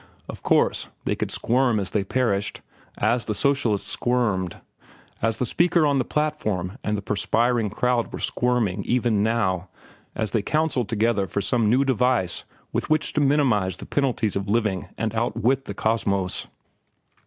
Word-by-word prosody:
Of -, -, -8 dB
course, -, -, +2 dB, 0.2 s
they -, -, +1 dB
could -, -, -3 dB
squirm 120 Hz, -2 st, +1 dB
as 95 Hz, -2 st, -3 dB
they 105 Hz, -, +1 dB
perished, 100 Hz, -2 st, -1 dB, 0.4 s
as 120 Hz, 0 st, +1 dB
the 105 Hz, -, -2 dB
socialists 135 Hz, -7 st, +1 dB
squirmed, 105 Hz, -8 st, 0 dB, 0.6 s
as 115 Hz, 0 st, +1 dB
the 125 Hz, -, 0 dB
speaker 170 Hz, +5 st, +2 dB
on 140 Hz, -2 st, +2 dB
the -, -, +2 dB
platform 115 Hz, -10 st, -2 dB
and 105 Hz, 0 st, 0 dB
the 100 Hz, -, -6 dB
perspiring 115 Hz, +3 st, +1 dB
crowd 120 Hz, +3 st, 0 dB
were -, -, -5 dB
squirming 115 Hz, -6 st, 0 dB
even 120 Hz, -4 st, +1 dB
now 95 Hz, -5 st, 0 dB, 0.5 s
as 110 Hz, -, -1 dB
they 115 Hz, -, +1 dB
counselled 150 Hz, -2 st, 0 dB
together 110 Hz, -3 st, +1 dB
for 95 Hz, -, -2 dB
some 105 Hz, +2 st, +2 dB
new 130 Hz, +5 st, +3 dB
device 125 Hz, -8 st, +1 dB, 0.3 s
with -, -, -2 dB
which 155 Hz, -1 st, +1 dB
to 150 Hz, -, +1 dB
minimize 130 Hz, -, +2 dB
the -, -, -9 dB
penalties 125 Hz, -7 st, 0 dB
of 100 Hz, 0 st, -2 dB
living 105 Hz, -4 st, 0 dB
and 110 Hz, -1 st, -2 dB
outwit 120 Hz, +3 st, 0 dB
the 100 Hz, -, -6 dB
Cosmos. 100 Hz, -4 st, 0 dB
115 Hz, 160 wpm, -24 LUFS, 100-125 Hz, 0.6 s, new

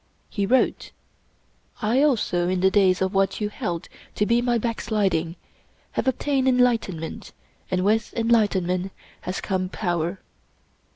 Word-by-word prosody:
He 200 Hz, -2 st, -1 dB
wrote: 260 Hz, +4 st, +1 dB, 0.5 s
" -, -, -32 dB
I 235 Hz, +6 st, +3 dB
also, 215 Hz, -11 st, +2 dB
in 185 Hz, -1 st, 0 dB
the 190 Hz, 0 st, +4 dB
days 190 Hz, -2 st, +3 dB
of 190 Hz, +1 st, -1 dB
what 195 Hz, 0 st, +1 dB
you 210 Hz, -1 st, -1 dB
held 175 Hz, -5 st, -4 dB, 0.3 s
to 210 Hz, -, +1 dB
be 235 Hz, +2 st, +2 dB
my 240 Hz, -1 st, +1 dB
backsliding, 205 Hz, -7 st, -1 dB, 0.6 s
have -, -, -2 dB
obtained 265 Hz, +1 st, +1 dB
enlightenment, 230 Hz, -10 st, 0 dB, 0.4 s
and 185 Hz, 0 st, 0 dB
with 220 Hz, +2 st, +1 dB
enlight 230 Hz, -3 st, +3 dB
enment 185 Hz, +1 st, -1 dB, 0.3 s
has 185 Hz, -, -4 dB
come 185 Hz, -2 st, -2 dB
power." 175 Hz, -2 st, -2 dB
200 Hz, 140 wpm, -24 LUFS, 185-235 Hz, 0.6 s, the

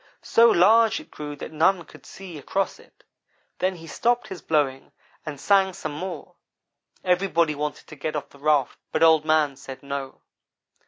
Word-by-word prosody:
So 230 Hz, 0 st, +5 dB
large 225 Hz, +4 st, +5 dB
it -, -, -15 dB
grew 145 Hz, -1 st, -7 dB
that -, -, -8 dB
none 170 Hz, +3 st, +2 dB
could -, -, -16 dB
see 180 Hz, -5 st, -10 dB
across 195 Hz, +7 st, -2 dB
it. -, -, -22 dB, 0.6 s
Then 185 Hz, 0 st, 0 dB
he 165 Hz, -1 st, -12 dB
stopped 240 Hz, +8 st, 0 dB
his 190 Hz, -, -7 dB
blowing 140 Hz, -4 st, -1 dB, 0.3 s
and 145 Hz, -2 st, -5 dB
sang 195 Hz, +1 st, +3 dB
some 155 Hz, -, -5 dB
more. 170 Hz, +2 st, -6 dB, 0.7 s
Everybody 180 Hz, -3 st, +2 dB
wanted 150 Hz, 0 st, -4 dB
to -, -, -12 dB
get 155 Hz, +2 st, -4 dB
off 145 Hz, -1 st, -4 dB
the 140 Hz, -, -18 dB
raft, 145 Hz, -2 st, +1 dB
but -, -, +1 dB
Old 160 Hz, -2 st, +5 dB
man 155 Hz, -3 st, +2 dB
said 135 Hz, -1 st, -10 dB
'no.' 140 Hz, -1 st, -5 dB
155 Hz, 170 wpm, -24 LUFS, 145-190 Hz, 0.7 s, So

